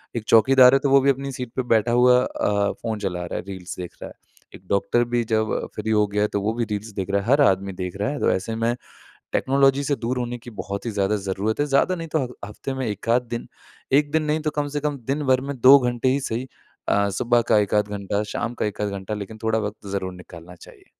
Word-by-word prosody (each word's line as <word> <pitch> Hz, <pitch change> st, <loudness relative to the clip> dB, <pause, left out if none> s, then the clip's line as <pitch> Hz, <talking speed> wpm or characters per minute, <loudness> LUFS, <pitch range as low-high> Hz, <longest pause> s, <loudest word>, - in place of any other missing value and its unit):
एक 115 Hz, -, -2 dB
चौकीदार 125 Hz, +3 st, +6 dB
है 135 Hz, -, +5 dB
तो 140 Hz, -, 0 dB
वो 135 Hz, 0 st, +6 dB
भी 140 Hz, -, +3 dB
अपनी 135 Hz, +1 st, -1 dB
सीट 125 Hz, -2 st, -6 dB
पे 130 Hz, -, 0 dB
बैठा 115 Hz, +2 st, +2 dB
हुआ 125 Hz, +1 st, +5 dB
अ, 100 Hz, -1 st, 0 dB
फ़ोन 110 Hz, -2 st, -3 dB
चला 90 Hz, -3 st, -3 dB
रहा -, -, -6 dB
है, -, -, -3 dB
रील्स 95 Hz, -2 st, -7 dB
देख 90 Hz, -, -7 dB
रहा -, -, -5 dB
है। -, -, -13 dB, 0.4 s
एक 95 Hz, -, -16 dB
डॉक्टर 110 Hz, +4 st, +2 dB
भी 120 Hz, -1 st, +2 dB
जब 110 Hz, -1 st, 0 dB, 0.2 s
फ्री 110 Hz, +1 st, -2 dB
हो 105 Hz, -1 st, +4 dB
गया 105 Hz, +1 st, -1 dB
है 105 Hz, -, +3 dB
तो 100 Hz, -, 0 dB
वो 110 Hz, +2 st, 0 dB
भी 120 Hz, 0 st, -1 dB
रील्स 105 Hz, +2 st, -3 dB
देख 95 Hz, -, -3 dB
रहा 100 Hz, 0 st, +2 dB
है, 100 Hz, -, -9 dB
हर 140 Hz, +2 st, +5 dB
आदमी 95 Hz, -4 st, +2 dB
देख 90 Hz, 0 st, -5 dB
रहा 105 Hz, +4 st, -1 dB
है। 145 Hz, -, -4 dB
तो -, -, +2 dB
ऐसे 100 Hz, +4 st, -2 dB
में 115 Hz, +2 st, 0 dB, 0.6 s
टेक्नोलॉजी 135 Hz, +1 st, +3 dB
से 140 Hz, 0 st, 0 dB
दूर 125 Hz, +1 st, -3 dB
होने 120 Hz, 0 st, -3 dB
की 120 Hz, +1 st, -12 dB
बहुत 100 Hz, +4 st, -6 dB
ही 115 Hz, -, -2 dB
ज़्यादा 100 Hz, 0 st, 0 dB
ज़रूरत 100 Hz, +6 st, -1 dB
है। 145 Hz, -, +2 dB
ज़्यादा 145 Hz, +6 st, +2 dB
नहीं 165 Hz, -1 st, -6 dB
तो 140 Hz, -, +1 dB
हग 125 Hz, -, -7 dB
हफ्ते 105 Hz, +6 st, -6 dB
में 130 Hz, -1 st, -3 dB
1 105 Hz, +2 st, -5 dB
आध 120 Hz, +2 st, +4 dB
दिन, 120 Hz, -, -4 dB, 0.4 s
1 145 Hz, +1 st, +3 dB
दिन 155 Hz, 0 st, +1 dB
नहीं 150 Hz, +1 st, 0 dB
तो -, -, -9 dB
कम 145 Hz, -, -1 dB
से -, -, +1 dB
कम 145 Hz, -1 st, -2 dB
दिनभर 135 Hz, -3 st, +1 dB
में -, -, -5 dB
2 135 Hz, +3 st, +9 dB
घंटे 125 Hz, 0 st, 0 dB
ही 135 Hz, +2 st, +1 dB
सही 125 Hz, +1 st, -3 dB, 0.4 s
अ, 100 Hz, 0 st, +2 dB
सुबह 120 Hz, +4 st, +2 dB
का -, -, +5 dB
1 100 Hz, -1 st, -1 dB
आध 105 Hz, 0 st, +2 dB
घंटा, 100 Hz, 0 st, -2 dB
शाम 115 Hz, +3 st, -4 dB
का -, -, +1 dB
1 105 Hz, 0 st, -4 dB
आध 105 Hz, -, 0 dB
घंटा, 100 Hz, +1 st, -5 dB
लेकिन 105 Hz, +1 st, -6 dB
थोड़ा 110 Hz, 0 st, +1 dB
वक़्त 105 Hz, 0 st, -6 dB
ज़रूर 95 Hz, -1 st, -3 dB
निकालना 90 Hz, -1 st, -12 dB
चाहिए। -, -, -16 dB
115 Hz, 265 wpm, -23 LUFS, 100-130 Hz, 0.6 s, 2